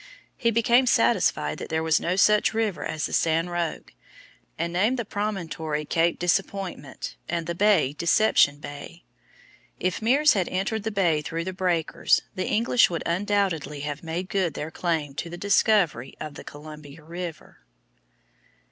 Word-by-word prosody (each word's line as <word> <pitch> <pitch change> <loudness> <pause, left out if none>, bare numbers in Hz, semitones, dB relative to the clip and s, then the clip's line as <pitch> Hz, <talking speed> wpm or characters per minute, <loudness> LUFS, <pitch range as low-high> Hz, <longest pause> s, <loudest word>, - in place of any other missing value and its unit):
He 235 - +1
became 235 +3 +3
satisfied - - +2
that - - -7
there 160 0 -1
was 160 -1 +3
no 180 - -1
such 210 +2 +4
river 220 -5 -1
as 155 - -2
the - - -5
San 165 +2 +1
Roque, 175 -2 -3 0.6
and 170 +1 -2
named 215 +9 +2
the 235 - -3
promontory 165 -8 -3
Cape 165 +2 +1
Disappointment 180 -5 -2
and 170 -1 -2
the 170 - -2
bay 175 -7 +3
Deception 170 -3 +3
Bay. 145 +4 -10 0.8
If 185 -1 -1
Meares 275 +7 +4
had 190 -4 0
entered 195 +4 -1
the 220 - -2
bay 175 -7 +1
through 165 +2 -4
the 185 +2 -4
breakers, 180 -4 +1
the 185 - -3
English 230 +3 +3
would 170 -2 -3
undoubtedly 175 -6 -1
have 145 0 -4
made 170 +3 -4
good 185 -4 -1
their 155 +2 -5
claim 160 -5 -2
to 165 +4 -5
the 175 - -7
discovery 195 - +2
of 155 -1 -6
the - - -10
Columbia 150 0 -11
River. 170 0 -8
175 Hz, 155 wpm, -25 LUFS, 160-200 Hz, 0.8 s, such